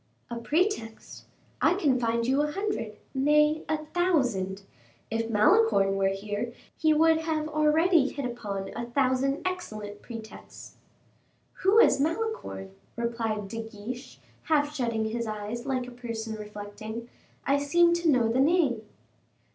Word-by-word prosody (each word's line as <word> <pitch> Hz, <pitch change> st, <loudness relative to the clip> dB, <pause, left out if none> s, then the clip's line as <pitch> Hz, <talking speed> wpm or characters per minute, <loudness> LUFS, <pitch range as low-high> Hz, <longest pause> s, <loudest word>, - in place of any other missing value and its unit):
"A 235 Hz, -, -3 dB
pretext; 290 Hz, -, -2 dB, 0.4 s
I 360 Hz, -, +4 dB
can 285 Hz, -9 st, +2 dB
find 230 Hz, 0 st, 0 dB
you 265 Hz, +4 st, +2 dB
a 295 Hz, 0 st, 0 dB
hundred, 390 Hz, -, -3 dB, 0.2 s
nay, 300 Hz, +3 st, +3 dB
a 310 Hz, -1 st, -1 dB
thousand. 250 Hz, -, 0 dB, 0.5 s
If 225 Hz, 0 st, -1 dB
Malicorne 215 Hz, -, +4 dB
were 195 Hz, 0 st, +2 dB
here, 205 Hz, +4 st, -3 dB, 0.2 s
he 315 Hz, 0 st, +2 dB
would 320 Hz, +1 st, +5 dB
have 315 Hz, -1 st, -1 dB
already 305 Hz, 0 st, +3 dB
hit 280 Hz, -3 st, -5 dB
upon 205 Hz, -5 st, -4 dB
a 235 Hz, -, -4 dB
thousand 265 Hz, +2 st, +1 dB
excellent 215 Hz, -, -4 dB
pretexts." 225 Hz, -2 st, -10 dB, 0.8 s
"Who 390 Hz, +4 st, +4 dB
is 455 Hz, -, +6 dB
Malicorne?" 330 Hz, -, -2 dB, 0.2 s
replied 230 Hz, -3 st, -2 dB
De 225 Hz, +3 st, -5 dB
Guiche, 225 Hz, +3 st, -8 dB, 0.3 s
half 295 Hz, -2 st, +2 dB
shutting 230 Hz, -5 st, -1 dB
his 230 Hz, +1 st, -2 dB
eyes, 215 Hz, +4 st, -5 dB
like 255 Hz, -2 st, -1 dB
a 250 Hz, -, -9 dB
person 230 Hz, -2 st, -5 dB
reflecting, 210 Hz, +2 st, -7 dB, 0.4 s
"I 280 Hz, +1 st, +3 dB
seem 340 Hz, +4 st, +4 dB
to 340 Hz, -1 st, +1 dB
know 250 Hz, -5 st, +4 dB
the 230 Hz, +3 st, +1 dB
name." 285 Hz, -6 st, +3 dB
250 Hz, 140 wpm, -28 LUFS, 220-310 Hz, 0.8 s, is